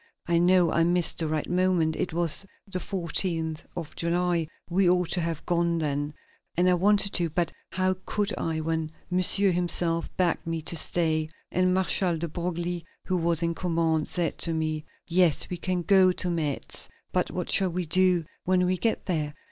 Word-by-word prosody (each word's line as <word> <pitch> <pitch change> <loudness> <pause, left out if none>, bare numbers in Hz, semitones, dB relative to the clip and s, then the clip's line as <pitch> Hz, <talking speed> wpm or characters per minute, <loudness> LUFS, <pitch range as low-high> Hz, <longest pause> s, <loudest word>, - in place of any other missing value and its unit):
I 170 -1 +2
know 175 -1 +4
I 165 - +3
missed 175 0 +1
the 160 - 0
right 155 -1 -2
moment; 180 -3 +1
it 180 - -2
was 170 +2 +3 0.2
the 195 -3 -4
14th 165 -3 0 0.2
of 165 -3 -6
July; 170 -1 0 0.2
we 180 +1 +2
ought 180 -1 +1
to 180 - +1
have 165 -2 -3
gone 170 -1 +1
then, 145 -1 -2 0.4
and 180 +1 +3
I 180 - +5
wanted 200 +2 +3
to, 170 -2 +1
but 170 +1 -1 0.2
how 185 +1 +1
could 205 -1 -1
I 160 -1 -2
when 160 0 -2 0.2
Monsieur 185 +2 +4
himself 170 -1 0
begged 175 -2 0
me 165 -1 -2
to 170 - -2
stay, 160 -1 +1 0.2
and 185 +1 +2
Marshal 185 -2 +2
de 170 +2 -3
Broglie, 175 +1 -3 0.2
who 185 - 0
was 170 -1 +1
in 170 0 +1
command, 165 -3 0
said 175 -2 -2
to 165 - -1
me: 155 -1 -2 0.2
"Yes, 175 -2 +2
we 180 - -2
can 180 0 -2
go 190 -1 +5
to 180 0 -1
Metz. 155 -5 -2 0.2
But - - 0
what - - -4
shall 190 -1 +3
we 180 +1 -2
do 180 +1 +3 0.2
when 180 0 +2
we 185 +1 +1
get 225 - 0
there?" 155 -5 -2
170 Hz, 185 wpm, -27 LUFS, 165-180 Hz, 0.4 s, I